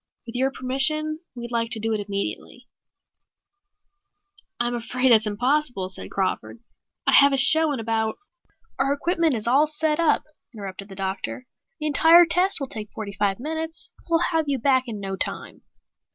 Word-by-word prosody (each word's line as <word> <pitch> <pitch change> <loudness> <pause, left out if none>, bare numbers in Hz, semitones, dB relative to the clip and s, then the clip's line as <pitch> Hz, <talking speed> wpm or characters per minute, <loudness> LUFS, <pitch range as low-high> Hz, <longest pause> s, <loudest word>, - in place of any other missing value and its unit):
With 230 - -8
your 260 +2 +1
permission, 305 +4 -1 0.2
we'd 240 0 -7
like 230 -1 -1
to 225 - 0
do 225 +1 -1
it 215 - -1
immediately." 200 -1 -5 1.9
"I'm 240 0 0
afraid 250 +2 0
that's 220 -1 +5
impossible," 245 -2 0
said 190 - -6
Crawford. 195 +4 -2 0.5
"I - - +4
have 280 0 +6
a - - +2
show 315 +4 +4
in 275 - -2
about 220 -1 -1 0.3
" 455 - -37
"Our 275 +1 +2
equipment 330 0 +1
is 215 - -3
all 275 +6 +4
set 305 +1 0
up," 330 -2 +3 0.3
interrupted 195 -1 -8
the 195 - -10
doctor. 195 +6 -4 0.3
"The 305 - -4
entire 325 +3 +6
test 360 +3 +2
will 275 - -2
take 215 -5 -7
forty 205 -2 -6
five 195 +1 0
minutes. 320 +4 -5 0.2
We'll 335 +1 +2
have 325 -2 +1
you 275 - +1
back 260 +1 +2
in 220 -3 -5
no 195 -1 -4
time." - - -3
255 Hz, 170 wpm, -24 LUFS, 220-305 Hz, 1.9 s, have